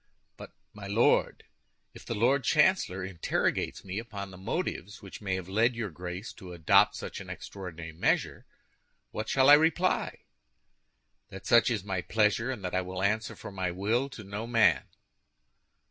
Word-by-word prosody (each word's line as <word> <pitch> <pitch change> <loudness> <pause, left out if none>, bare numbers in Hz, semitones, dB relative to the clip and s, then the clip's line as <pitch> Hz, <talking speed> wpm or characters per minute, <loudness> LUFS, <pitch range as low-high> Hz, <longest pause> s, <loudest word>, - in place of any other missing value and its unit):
"But, - - -11 0.2
my 100 -1 -9
Lord, 105 +4 +2 0.5
if - - -13
the 115 - -2
Lord 130 +6 +2
Chancellor 150 - +2
interrogates 95 -3 -1
me 95 +2 -4
upon 100 -4 -7
the - - -11
motives 105 - -4
which 95 - -10
may 95 -2 -1
have 95 -1 -5
led 115 +5 +2
your 110 -5 -4
Grace 90 +5 -7
to 90 -2 -10
adopt 85 -2 +4
such - - -6
an - - -10
extraordinary 85 -4 -8
measure, 80 - -1 0.6
what 110 +1 -4
shall 135 0 +4
I 145 - +10
reply?" 165 +4 +2 1.1
"That 95 0 -10
such 120 +3 +5
is 110 -5 -1
my 95 -2 -2
pleasure, 110 +4 +1
and 115 -8 -4
that 90 - -4
I 90 - +2
answer 95 +4 -1
for - - -9
my 95 -2 -2
will 110 +9 0
to 115 -5 -10
no 100 +3 -5
man." 115 -4 +3
100 Hz, 160 wpm, -29 LUFS, 95-115 Hz, 1.1 s, I